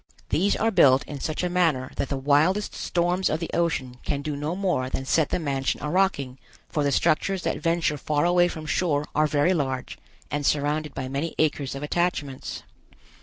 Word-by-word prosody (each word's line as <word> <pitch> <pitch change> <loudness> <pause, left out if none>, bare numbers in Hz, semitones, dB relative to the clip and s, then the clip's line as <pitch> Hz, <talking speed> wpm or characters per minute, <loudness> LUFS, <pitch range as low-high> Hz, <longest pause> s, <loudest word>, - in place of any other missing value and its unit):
These 195 +5 +2
are 225 +1 +1
built 135 -9 +5
in 145 -2 -7
such 155 +5 -3
a - - +2
manner 165 -8 +1
that 140 - -2
the 140 - -1
wildest 150 +9 +2
storms 180 +2 0
of 155 - -1
the 165 - -5
ocean 130 -7 -1
can 140 -1 -2
do 150 -1 -3
no 150 +4 -3
more 180 -10 0
than 135 - -3
set 155 +2 +2
the - - 0
mansion 140 -5 -1
a 150 - -2
rocking, 140 -9 0 0.3
for 150 - 0
the 140 - +1
structures 185 +7 +1
that - - -2
venture 165 -3 +1
far 145 +2 0
away 175 0 +4
from 160 -3 -6
shore 155 -3 0
are 155 0 +3
very 150 +5 +2
large, 130 -6 -3 0.3
and 145 0 -1
surrounded 150 +1 0
by 130 -1 -3
many 140 +5 -3
acres 145 -3 0
of 140 - -6
attachments. 150 -4 -2
150 Hz, 195 wpm, -25 LUFS, 140-175 Hz, 0.3 s, built